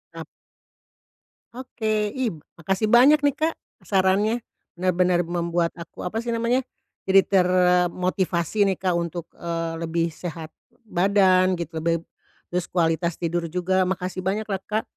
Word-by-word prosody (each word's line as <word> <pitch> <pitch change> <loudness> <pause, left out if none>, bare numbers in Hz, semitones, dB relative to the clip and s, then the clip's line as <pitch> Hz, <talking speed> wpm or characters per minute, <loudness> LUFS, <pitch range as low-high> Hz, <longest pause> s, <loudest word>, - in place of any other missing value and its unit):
Ap - - -7 1.3
Oke, 250 -2 -8 0.3
ih, 245 -7 0 0.2
makasih 195 +6 -1
banyak 275 +6 +6
nih, 285 -1 +2
Kak, 320 +1 +1 0.3
sarannya 200 +4 +2 0.3
benar-benar 180 0 +2
membuat 170 0 -1
aku, 170 - -10
apa 195 +5 -4
sih 235 0 -2
namanya, 235 +3 0 0.4
jadi 195 0 +6
termotivasi 180 +1 +2
nih, 195 - +2
Kak, 180 -2 +1
untuk, 170 0 -4
eee, 165 -1 -3
lebih 165 0 -1
sehat 160 0 -7 0.3
badan 185 -2 +3
gitu. 170 -2 -5
Lebih, 165 +1 0 0.5
terus 180 0 -1
kualitas 170 -1 0
tidur 170 0 -1
juga. 185 +1 +1
Makasih 185 0 -3
banyaklah, 205 0 -1
Kak! 215 +1 -1
180 Hz, 130 wpm, -24 LUFS, 170-205 Hz, 1.3 s, banyak